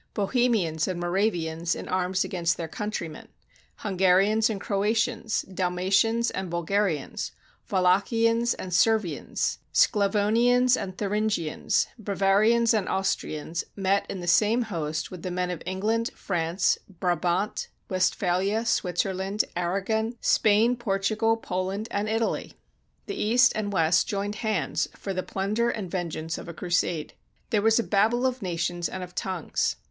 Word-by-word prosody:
Bohemians 200 -7 +1
and 185 -2 -3
Mora 185 +5 +2
vians 165 -2 -2
in - - -7
arms 185 0 0
against 175 -2 -1
their 165 - -4
countr3anen, 170 -3 -5 0.5
Hungarians 195 +3 +3
and 210 -3 -3
Croatians, 220 +3 0
Dalmatians 190 +5 +1
and 190 -2 -4
Bulgarians, 170 -2 -1 0.4
Wallachians 225 +6 +2
and 185 -1 -6
Servians, 210 -4 +1
Sclavonians 230 +4 +3
and 185 -5 -5
Thuringians, 205 -6 0 0.2
Bava 195 -1 +2
rians 230 +1 +4
and 205 -4 0
Austrians, 170 -4 -2
met 195 0 +1
in 190 - -5
the - - -5
same 220 +7 +4
host 160 -7 -3
with 180 -2 -8
the 185 - -4
men 180 0 -1
of 175 - -5
England, 220 +5 0
France, 170 0 0 0.2
Brabant, 180 +3 0 0.2
Westphalia, 190 +3 +1
Switzer 190 -3 0
land, 195 +3 -1
Aragon, 200 +6 -1
Spain, 220 +3 +3
Portugal, 220 +1 +1
Poland, 190 +1 -3
and 205 +1 -1
Italy. 225 +1 -1 0.5
The 400 - -4
East 245 +4 +5
and 210 -1 -2
West 165 -3 +3
joined 205 +1 -2
hands 215 -7 0
for 195 - -5
the 185 - -1
plunder 210 +6 -1
and 195 -7 -4
venge 175 -4 -3
ance 160 +1 -4
of - - -9
a 170 - -8
crusade. 175 -3 -1 0.4
There 210 - +3
was 225 +1 +4
a 235 - +2
Babel 225 +5 +2
of 255 -1 -1
nations 175 -1 -2
and 185 - -5
of 180 0 -10
tongues. 185 -4 -1
195 Hz, 140 wpm, -26 LUFS, 180-220 Hz, 0.5 s, East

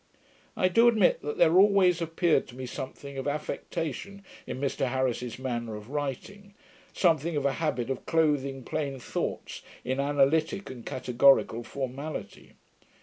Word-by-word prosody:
I 185 - +3
do 230 +6 +5
admit, 220 -6 +4
that 150 - -4
there 170 +2 +5
always 190 -3 +5
appeared 165 0 +1
to 125 - -12
me 130 0 -6
something 135 +1 -7
of 135 - -4
affectation 165 +6 -4 0.2
in - - -5
Mr 135 -1 -1
Harris's 125 -2 -1
manner 120 -4 -3
of 105 +4 -10
writing; 175 +9 -5 0.4
something 165 -2 +2
of 140 - -1
a 140 - +2
habit 135 -5 -1
of 135 - -5
clothing 145 -5 +1
plain 140 0 -3
thoughts - - -4 0.2
in 130 +2 -1
analytick 145 +6 +1
and 120 -3 -9
categorical 125 -1 +3
formality. 140 +4 -6
140 Hz, 145 wpm, -28 LUFS, 130-165 Hz, 0.4 s, do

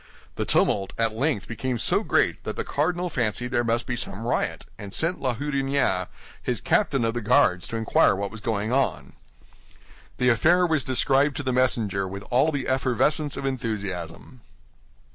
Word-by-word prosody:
The - - -2
tumult 95 -1 +1
at 115 -1 +1
length 115 - -1
became 125 +1 -3
so - - +1
great - - +1
that - - -4
the - - -3
cardinal 175 +5 -1
fancied 125 - -1
there 120 -1 +1
must 115 0 0
be 125 - -2
some 115 -2 -4
riot, 120 - -1
and 100 0 -7
sent 170 +3 0
La 130 -3 0
Houdinière, 135 -8 0 0.3
his - - -2
captain 130 -4 +1
of 115 - 0
the 120 - -3
Guards, 105 -7 +3
to - - -5
inquire 110 -3 +3
what 100 +1 -4
was 110 - -9
going 110 0 -2
on. 135 0 -1 1.0
The 125 - +3
affair 170 +10 +4
was 160 -5 +1
described 135 +2 +2
to 145 - -3
the 130 -1 -1
messenger 110 -6 +1
with 100 +1 -7
all 135 +6 +3
the 140 -3 -3
effervescence 130 +3 +1
of 135 - -4
enthusiasm. 105 -4 -4
125 Hz, 175 wpm, -25 LUFS, 110-135 Hz, 1.0 s, affair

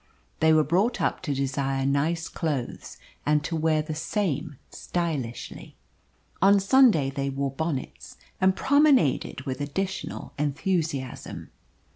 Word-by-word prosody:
They 160 - +4
were 155 -1 +5
brought 190 +10 +1
up - - 0
to 145 - -2
desire 135 0 -1
nice 155 +5 0
clothes, 145 -7 -4 0.3
and 150 0 +2
to 165 - -3
wear 155 -1 +1
the 155 0 -5
same 155 - -2
stylishly. 150 -9 -4 0.7
On 200 +2 +6
Sunday 195 - +4
they 140 0 -2
wore 135 0 -2
bonnets, 145 -1 -5 0.2
and 190 0 +4
promenaded 280 - +3
with 130 +1 -5
additional 190 +7 -4
enthusiasm. 150 -3 -2
155 Hz, 120 wpm, -26 LUFS, 140-180 Hz, 0.7 s, On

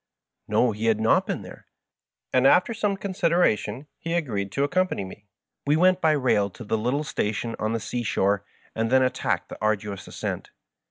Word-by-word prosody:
No, 125 - +3
he 110 +2 -3
had 110 -1 +3
not 110 0 +3
been - - -3
there, - - -12 0.7
and 130 +1 +5
after 180 +10 +4
some 205 -3 -1
consideration 170 - +1
he 165 +1 -2
agreed 105 - -2
to 140 +1 +1
accom 185 +4 +1
pany 100 - -3
me. 100 +2 -12 0.4
We 145 - +4
went 185 +2 +4
by 160 -1 +4
rail 125 -8 +2
to 115 - -11
the 110 +1 -1
little 125 +7 0
station 115 -3 -2
on 110 +1 -1
the 115 - 0
sea 120 +3 -3
shore, 100 -3 +1 0.3
and 115 0 -1
then 130 0 +5
attacked 130 0 -1
the - - -9
arduous 105 -2 -1
ascent. - - -5
125 Hz, 185 wpm, -25 LUFS, 105-160 Hz, 0.7 s, and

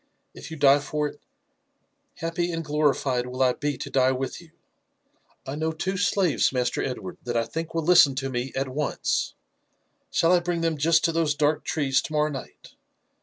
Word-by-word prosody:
If - - -10
you 160 - -7
die 140 0 +5
for 150 +1 -2
it, - - -15 1.0
happy 170 +2 -2
and 165 -1 -4
glorified 145 -4 +1
will 130 +1 -1
I 125 -1 +3
be 145 0 -3
to - - -6
die 130 -1 +3
with 130 +4 -4
you. 170 - -17 1.0
I 135 - -5
know 160 +2 -1
two 190 +4 -3
slaves. 185 -3 +2
Master 125 -2 -1
Edward, 110 -8 -5
that 120 -1 -2
I 115 - +2
think 165 +4 -5
will 165 - 0
listen 155 -5 +6
to 135 0 -3
me 125 +1 -3
at 135 +1 -1
once; 140 +3 -2 0.7
shall 165 - +2
I 180 - +5
bring 175 -1 -2
them 165 -2 -1
just 160 +2 +3
to 165 - +2
those 160 -3 +1
dark 150 +1 +1
trees 135 -3 +1
to 155 - -7
morrow 150 0 +1
night?" 135 -2 -9
150 Hz, 190 wpm, -25 LUFS, 135-165 Hz, 1.0 s, listen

